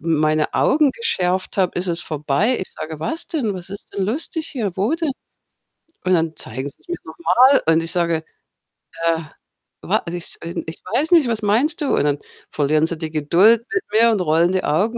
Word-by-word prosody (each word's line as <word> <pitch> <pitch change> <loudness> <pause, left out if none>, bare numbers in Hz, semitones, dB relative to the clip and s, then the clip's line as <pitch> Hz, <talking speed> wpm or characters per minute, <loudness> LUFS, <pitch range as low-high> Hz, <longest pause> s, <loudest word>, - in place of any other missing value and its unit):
meine 155 0 +1
Augen 300 -1 +3
geschärft 185 - -1
habe, 185 -2 +1
ist 180 - -1
es 170 -1 -1
vorbei. 155 - 0
Ich 185 - -6
sage: 155 0 -7
„Was 320 - -2
denn? 245 -11 -1
Was 180 -1 -8
ist 200 +1 -10
denn 195 - -1
lustig 310 - -2
hier? 225 -9 -2
Wo 200 +7 0
denn?“ 325 -3 -1 0.9
Und 185 - +1
dann 165 -2 +1
zeigen 130 +5 -3
sie's - - -20
mir 350 0 -3
noch - - -12
mal 270 -4 +4
und 160 - +3
ich 165 - 0
sage: 170 -2 0 0.8
„Äh, 165 -1 +2 0.6
wa - - 0
ich 170 - -4
s 175 - -2 0.3
ich 160 - -8
weiß 315 +4 +1
nicht, 325 -7 +5
was 225 -2 -1
meinst 230 +11 +1
du?“ 290 - 0
Und - - +1
dann 145 -1 0 0.3
verlieren 155 +2 +2
sie 170 - -2
die 160 -1 -5
Geduld 185 +10 +4
mit 375 - 0
mir 230 +2 +6
und 210 -4 0
rollen 170 +2 +2
die 185 - 0
Augen. 205 +11 0
185 Hz, 200 wpm, -20 LUFS, 160-235 Hz, 0.9 s, mir